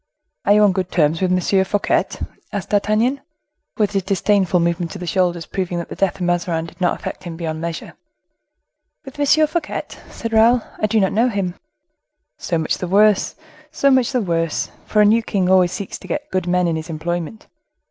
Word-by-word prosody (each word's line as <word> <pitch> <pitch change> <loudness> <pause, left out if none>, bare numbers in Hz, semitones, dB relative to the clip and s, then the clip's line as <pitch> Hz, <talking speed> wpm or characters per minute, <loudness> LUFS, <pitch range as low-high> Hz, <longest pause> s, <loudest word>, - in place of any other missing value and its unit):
"Are 205 - +5
you 210 0 +5
on 205 - +5
good 185 -1 -2
terms 160 0 +2
with 185 -1 +1
M. 185 +1 +2
Fouquet?" 205 +1 +1 0.5
asked 205 -2 -4
D'Artagnan, 215 +6 +1 0.6
with 210 -1 +1
a 195 - +1
disdainful 190 -1 +1
movement 170 +1 -1
of - - -6
the 180 - -5
shoulders, 175 -1 0
proving 180 -2 -3
that 170 - -5
the - - -6
death 195 -1 0
of 195 - -12
Mazarin 175 -2 0
did 165 - -14
not 175 - +1
affect - - -6
him 165 -2 -6
beyond 160 -2 -4
measure. 170 -1 -5 1.1
"With 270 +1 -11
M. 305 +2 +4
Fouquet?" 315 0 -3 0.3
said 230 -1 -6
Raoul; 230 +2 +5 0.2
"I 215 - +1
do 220 +1 +2
not 190 -2 +1
know 235 +4 +3
him." 195 -5 -2 0.9
"So 170 - -1
much 160 -1 -1
the 180 - -3
worse! 205 +2 +3 0.3
so 280 -3 +2
much 260 -2 +3
the 250 -3 +1
worse! 165 -3 -1 0.2
for 210 - +3
a - - +5
new 220 +3 +4
king 195 -4 -1
always 180 -2 +4
seeks 200 -1 -6
to - - -12
get 295 0 -4
good 185 -1 -1
men 180 0 +2
in 165 -1 0
his 160 +2 -7
employment." 170 +5 -4
190 Hz, 200 wpm, -20 LUFS, 175-215 Hz, 1.1 s, Are